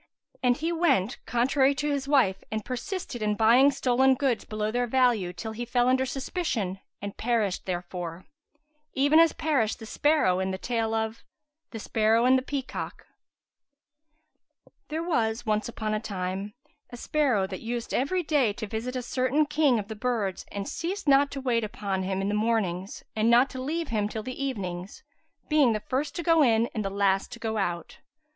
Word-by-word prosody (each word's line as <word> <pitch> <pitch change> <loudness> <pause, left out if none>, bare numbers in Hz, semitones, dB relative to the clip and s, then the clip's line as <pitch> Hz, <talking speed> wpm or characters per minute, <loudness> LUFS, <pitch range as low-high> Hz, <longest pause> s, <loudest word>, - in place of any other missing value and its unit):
And 250 -1 +3
he 325 +3 -1
went 275 - +1
contrary 265 +3 +2
to 295 +2 -1
his 280 -1 -2
wife 250 -10 +2
and 220 -1 -3
persisted 255 - -5
in 210 -1 +1
buying 235 +6 +6
stolen 265 -1 +3
goods 250 -5 0
below 215 0 -2
their 245 +1 0
value 240 -7 +2
till 200 +6 -6
he 225 +2 -5
fell 245 +1 +1
under 260 +1 +2
suspicion 255 - -2 0.2
and 200 0 -5
perished 220 -6 0
therefor: 175 -1 -5 0.7
even 285 +4 +5
as 330 -1 +6
perished 265 -9 0
the 225 - -10
sparrow 255 -8 +2
in 190 0 -1
the 190 - -3
tale 225 +1 -1
of 220 0 -3 0.5
THE 225 - -7
SPARROW 225 +2 +2
AND 255 +1 +6
THE 260 - +2
PEACOCK 270 0 -5 1.8
There 315 +2 -3
was 240 -8 0
once 215 +1 0
upon 215 -2 -3
a 215 - 0
time 195 0 -4 0.3
a 245 - -9
sparrow, 255 -8 +1
that 190 -1 -7
used 235 0 -4
every 350 +8 0
day 285 -9 +2
to 215 - -5
visit 225 +4 -4
a 250 - -2
certain 255 +5 +1
king 295 -4 +2
of 205 -2 -4
the 220 - -6
birds 215 -4 -2
and 200 -1 -4
ceased 360 +1 -4
not 280 0 +5
to 275 - -6
wait 240 -3 +1
upon 200 -2 -3
him 190 +1 -2
in - - -1
the 205 - -1
mornings 210 -4 -1
and 220 +1 +2
not 245 +3 +5
to 260 - -6
leave 320 +4 -2
him 210 -3 0
till 220 0 -5
the 255 +3 -5
evenings, 185 -8 -5 0.4
being 295 -7 +4
the 215 - -1
first 275 +6 -3
to 345 - -3
go 330 -1 +4
in 230 -3 +3
and 215 - -2
the 195 - -2
last 195 -1 +1
to - - -8
go 225 -1 -3
out. 175 -3 -3
235 Hz, 185 wpm, -27 LUFS, 210-270 Hz, 1.8 s, buying